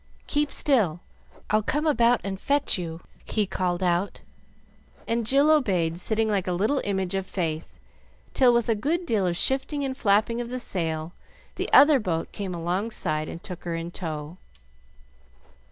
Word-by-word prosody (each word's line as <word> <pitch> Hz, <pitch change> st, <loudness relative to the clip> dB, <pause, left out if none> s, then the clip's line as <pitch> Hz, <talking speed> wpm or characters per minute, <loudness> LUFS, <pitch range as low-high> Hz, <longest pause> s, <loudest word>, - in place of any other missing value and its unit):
"Keep 295 Hz, -1 st, 0 dB
still! 210 Hz, -, +2 dB, 0.5 s
I'll 215 Hz, 0 st, +4 dB
come 295 Hz, +9 st, -1 dB
about 240 Hz, -5 st, +3 dB
and 195 Hz, -1 st, -5 dB
fetch 285 Hz, 0 st, +2 dB
you!" 170 Hz, -2 st, -5 dB, 0.2 s
he 215 Hz, -2 st, 0 dB
called 180 Hz, -1 st, -2 dB
out; 180 Hz, +2 st, 0 dB, 0.9 s
and 230 Hz, -1 st, -1 dB
Jill 280 Hz, +4 st, +4 dB
obeyed, 180 Hz, -, +1 dB
sitting 220 Hz, +3 st, +1 dB
like 200 Hz, -4 st, 0 dB
a 180 Hz, -, 0 dB
little 215 Hz, +10 st, +1 dB
image 190 Hz, -2 st, -1 dB
of 195 Hz, -1 st, -2 dB
faith, 165 Hz, -3 st, -3 dB, 0.6 s
till 255 Hz, -2 st, +5 dB
with 235 Hz, -1 st, +1 dB
a 230 Hz, -, +3 dB
good 310 Hz, -, -1 dB
deal 210 Hz, -, +1 dB
of 170 Hz, -1 st, -1 dB
shifting 275 Hz, -, 0 dB
and 265 Hz, -1 st, -3 dB
flapping 220 Hz, +1 st, +2 dB
of 240 Hz, -, -6 dB
the 250 Hz, -, -4 dB
sail, 165 Hz, -7 st, -2 dB, 0.4 s
the -, -, -4 dB
other 290 Hz, -1 st, +7 dB
boat 170 Hz, -7 st, -2 dB
came 195 Hz, -4 st, -5 dB
alongside 170 Hz, -3 st, -2 dB
and 170 Hz, -, -8 dB
took 180 Hz, -3 st, -8 dB
her 170 Hz, -1 st, -3 dB
in 165 Hz, +1 st, -5 dB
tow. 160 Hz, -1 st, -6 dB
200 Hz, 165 wpm, -25 LUFS, 175-245 Hz, 0.9 s, other